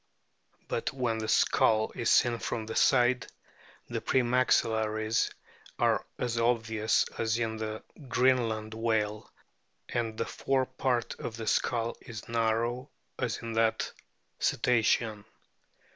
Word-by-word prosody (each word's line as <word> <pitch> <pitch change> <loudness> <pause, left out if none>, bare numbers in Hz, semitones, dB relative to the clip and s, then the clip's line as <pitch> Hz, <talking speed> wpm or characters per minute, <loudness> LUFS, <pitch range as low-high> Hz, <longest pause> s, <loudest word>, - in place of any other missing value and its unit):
But - - -2
when 120 -4 -1
the 110 - -3
skull 110 0 +3
is 115 - -1
seen 120 -3 +4
from 110 -1 -3
the 110 - -6
side, 125 -2 +3 0.6
the - - -3
pre 130 - +2
maxillaries 110 -3 +2 0.5
are - - +1
as 120 -1 -1
obvious 115 -2 +2
as 110 0 +1
in 115 -2 -2
the 110 0 -5 0.2
Greenland 115 -4 +1
whale, 110 -2 -1 0.6
and 115 -2 -2
the 115 - -1
fore 135 -1 0
part 130 -2 -1
of 115 - -5
the 115 - -5
skull 115 +1 0
is 115 -3 -9
narrow 115 +3 0 0.3
as 120 -6 -1
in 115 -1 -4
that 115 0 +1 0.5
cetacean. 110 -3 +1
115 Hz, 125 wpm, -29 LUFS, 110-120 Hz, 0.6 s, seen